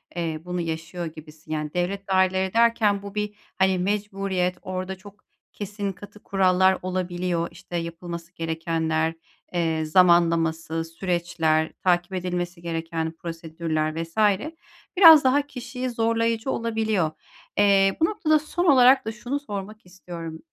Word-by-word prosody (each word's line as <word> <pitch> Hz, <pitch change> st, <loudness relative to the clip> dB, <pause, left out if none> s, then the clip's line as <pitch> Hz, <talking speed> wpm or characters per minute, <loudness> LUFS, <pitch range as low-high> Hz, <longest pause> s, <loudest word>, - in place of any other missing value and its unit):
eee, 165 Hz, -3 st, -3 dB
bunu 180 Hz, 0 st, -3 dB
yaşıyor 160 Hz, +1 st, -4 dB
gibisin. 155 Hz, 0 st, -11 dB
Yani 150 Hz, -1 st, -3 dB
devlet 195 Hz, +3 st, -2 dB
daireleri 190 Hz, 0 st, +2 dB
derken 225 Hz, -3 st, +3 dB
bu 200 Hz, 0 st, -9 dB
bir, 210 Hz, 0 st, -2 dB, 0.2 s
hani, 190 Hz, -1 st, +3 dB
mecburiyet, 195 Hz, -2 st, -1 dB
orada 185 Hz, 0 st, -4 dB
çok 205 Hz, +2 st, -15 dB, 0.3 s
kesin, 205 Hz, -1 st, -4 dB
katı 205 Hz, +2 st, -13 dB
kurallar 190 Hz, -1 st, +3 dB
olabiliyor. 180 Hz, -2 st, -2 dB
İşte 175 Hz, -1 st, -7 dB
yapılması 170 Hz, 0 st, -6 dB
gerekenler, 160 Hz, -1 st, -1 dB, 0.4 s
eee, 165 Hz, -2 st, 0 dB
zamanlaması, 165 Hz, -1 st, +3 dB
süreçler, 165 Hz, -2 st, 0 dB
takip 180 Hz, 0 st, +2 dB
edilmesi 180 Hz, -1 st, -3 dB
gereken 165 Hz, -1 st, -3 dB
prosedürler 165 Hz, -1 st, -3 dB
vs. 165 Hz, +5 st, -14 dB, 0.8 s
biraz 325 Hz, -5 st, +10 dB
daha 265 Hz, +2 st, +4 dB
kişiyi 250 Hz, -1 st, -5 dB
zorlayıcı 230 Hz, +1 st, 0 dB
olabiliyor. 220 Hz, -7 st, 0 dB, 0.5 s
Eee, 195 Hz, -1 st, +4 dB
bu 325 Hz, -, +6 dB
noktada 310 Hz, -5 st, +2 dB
son 345 Hz, +4 st, -2 dB
olarak 260 Hz, -5 st, +6 dB
da 220 Hz, -, -2 dB
şunu 245 Hz, +6 st, -4 dB
sormak 210 Hz, -5 st, -7 dB
istiyorum, 170 Hz, -3 st, -8 dB
180 Hz, 125 wpm, -24 LUFS, 165-205 Hz, 0.8 s, biraz